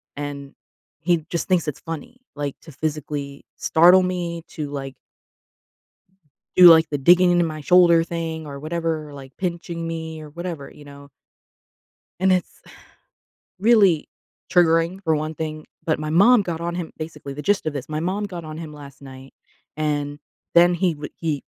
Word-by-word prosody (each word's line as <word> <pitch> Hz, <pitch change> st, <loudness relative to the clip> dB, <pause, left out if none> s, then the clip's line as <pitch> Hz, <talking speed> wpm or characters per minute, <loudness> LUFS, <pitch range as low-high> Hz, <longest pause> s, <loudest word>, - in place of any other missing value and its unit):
And 140 Hz, -1 st, -6 dB, 0.5 s
he 170 Hz, -2 st, +1 dB
just 170 Hz, -, -2 dB
thinks 180 Hz, -4 st, +2 dB
it's 150 Hz, -, -4 dB
funny, 165 Hz, -, -8 dB, 0.2 s
like, 145 Hz, -1 st, -4 dB
to 160 Hz, -, -13 dB
physically 145 Hz, -2 st, -4 dB
startle 180 Hz, +3 st, +5 dB
me, 175 Hz, -2 st, -3 dB
to, 150 Hz, -2 st, -5 dB
like 135 Hz, -2 st, -6 dB, 1.6 s
do, 180 Hz, -1 st, +10 dB
like, 160 Hz, -1 st, +7 dB
the 145 Hz, -, -1 dB
digging 175 Hz, +5 st, +5 dB
into 175 Hz, 0 st, +3 dB
my 155 Hz, -2 st, -6 dB
shoulder 170 Hz, -1 st, +5 dB
thing 165 Hz, -2 st, -5 dB
or 140 Hz, -1 st, -8 dB
whatever, 155 Hz, -1 st, -3 dB
like, 135 Hz, -1 st, -11 dB
pinching 170 Hz, -2 st, -4 dB
me 160 Hz, -1 st, -5 dB
or 155 Hz, -, -10 dB
whatever, 170 Hz, -3 st, -6 dB
you 145 Hz, -, -15 dB
know? 140 Hz, 0 st, -13 dB, 1.1 s
And 190 Hz, 0 st, +4 dB
it's 180 Hz, -1 st, -2 dB, 1.0 s
really 200 Hz, -7 st, +4 dB, 0.4 s
triggering 170 Hz, +1 st, +3 dB
for 160 Hz, -3 st, +2 dB
one 155 Hz, +1 st, -3 dB
thing, 155 Hz, 0 st, -5 dB, 0.2 s
but 155 Hz, -2 st, 0 dB
my 155 Hz, 0 st, -4 dB
mom 210 Hz, +8 st, +6 dB
got 170 Hz, -4 st, -4 dB
on 170 Hz, 0 st, -3 dB
him 175 Hz, -2 st, -5 dB
basically, 155 Hz, -3 st, -7 dB
the 150 Hz, -, -6 dB
gist 200 Hz, +3 st, +1 dB
of 155 Hz, -, -2 dB
this, 140 Hz, 0 st, -6 dB
my 155 Hz, 0 st, -2 dB
mom 190 Hz, +5 st, -2 dB
got 180 Hz, -4 st, -7 dB
on 155 Hz, 0 st, -8 dB
him 160 Hz, -2 st, -7 dB
last 140 Hz, -2 st, -13 dB
night, 135 Hz, 0 st, -12 dB, 0.4 s
and 145 Hz, -1 st, -2 dB, 0.4 s
then 175 Hz, +1 st, +6 dB
he 175 Hz, 0 st, +1 dB
w 150 Hz, -1 st, -8 dB
he 155 Hz, -4 st, -3 dB
160 Hz, 165 wpm, -22 LUFS, 145-175 Hz, 1.6 s, do